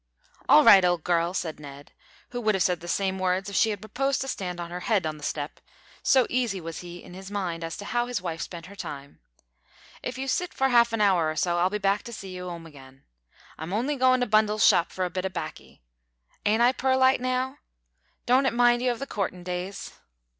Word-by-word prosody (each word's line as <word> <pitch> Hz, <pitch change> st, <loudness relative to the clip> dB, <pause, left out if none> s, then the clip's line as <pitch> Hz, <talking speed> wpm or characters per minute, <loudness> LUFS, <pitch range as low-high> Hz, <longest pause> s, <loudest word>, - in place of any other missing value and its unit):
"All -, -, +8 dB
right, 195 Hz, -2 st, +8 dB
old 175 Hz, -3 st, +1 dB
girl," 170 Hz, 0 st, +1 dB
said 160 Hz, -5 st, -3 dB
Ned, 145 Hz, -1 st, -11 dB, 0.4 s
who 245 Hz, 0 st, -4 dB
would 215 Hz, -2 st, +2 dB
have 190 Hz, -, +2 dB
said 180 Hz, -2 st, +1 dB
the 175 Hz, -, -10 dB
same 190 Hz, +1 st, -1 dB
words 185 Hz, +2 st, 0 dB
if -, -, -6 dB
she 225 Hz, -, +4 dB
had 205 Hz, -3 st, -4 dB
proposed 270 Hz, +5 st, -1 dB
to 270 Hz, -, -3 dB
stand 180 Hz, -8 st, -4 dB
on 170 Hz, 0 st, -6 dB
her 180 Hz, -, -4 dB
head 200 Hz, -2 st, 0 dB
on 155 Hz, -1 st, -3 dB
the 150 Hz, -, -13 dB
step 145 Hz, 0 st, -4 dB, 0.4 s
so 260 Hz, -3 st, +4 dB
easy 240 Hz, -6 st, -1 dB
was 165 Hz, -2 st, -7 dB
he 175 Hz, 0 st, -9 dB
in -, -, -12 dB
his 190 Hz, +1 st, -9 dB
mind 180 Hz, -5 st, -3 dB
as 165 Hz, 0 st, -5 dB
to 205 Hz, -, -8 dB
how 240 Hz, +3 st, -1 dB
his 245 Hz, -2 st, -2 dB
wife 170 Hz, -3 st, -5 dB
spent 170 Hz, -2 st, -7 dB
her 200 Hz, +3 st, -12 dB
time; 140 Hz, -7 st, -8 dB, 0.8 s
"if 250 Hz, 0 st, -5 dB
you 265 Hz, +1 st, -4 dB
sit 355 Hz, +6 st, -1 dB
for 270 Hz, 0 st, +2 dB
half 235 Hz, -1 st, +5 dB
an 225 Hz, -1 st, -1 dB
hour 180 Hz, -6 st, +3 dB
or 155 Hz, -, -3 dB
so 175 Hz, +2 st, 0 dB
I'll 180 Hz, +2 st, +3 dB
be 210 Hz, -, -2 dB
back 200 Hz, 0 st, +1 dB
to 235 Hz, -, -8 dB
see 190 Hz, -4 st, -8 dB
you 180 Hz, 0 st, -6 dB
'ome 170 Hz, -1 st, -8 dB
again. 135 Hz, -3 st, -15 dB, 0.6 s
I'm 160 Hz, +4 st, -5 dB
on'y 255 Hz, +8 st, 0 dB
goin' 255 Hz, -1 st, +3 dB
to -, -, +2 dB
Bundle's 215 Hz, -1 st, +3 dB
shop 170 Hz, -, +4 dB
for 185 Hz, -, -2 dB
a 180 Hz, -, -4 dB
bit 185 Hz, -, -3 dB
o' -, -, -5 dB
baccy. 175 Hz, -, -8 dB, 0.6 s
Ain't 220 Hz, +3 st, +3 dB
I 245 Hz, -, +6 dB
purlite 260 Hz, 0 st, +3 dB
now? 255 Hz, +2 st, -1 dB, 0.7 s
Don't 260 Hz, +2 st, +4 dB
it -, -, 0 dB
mind 240 Hz, 0 st, +4 dB
you 250 Hz, 0 st, +2 dB
of 240 Hz, -, -4 dB
the 275 Hz, -, -5 dB
courtin' 190 Hz, -7 st, -4 dB
days?" 180 Hz, +2 st, -5 dB
195 Hz, 235 wpm, -26 LUFS, 175-240 Hz, 0.8 s, All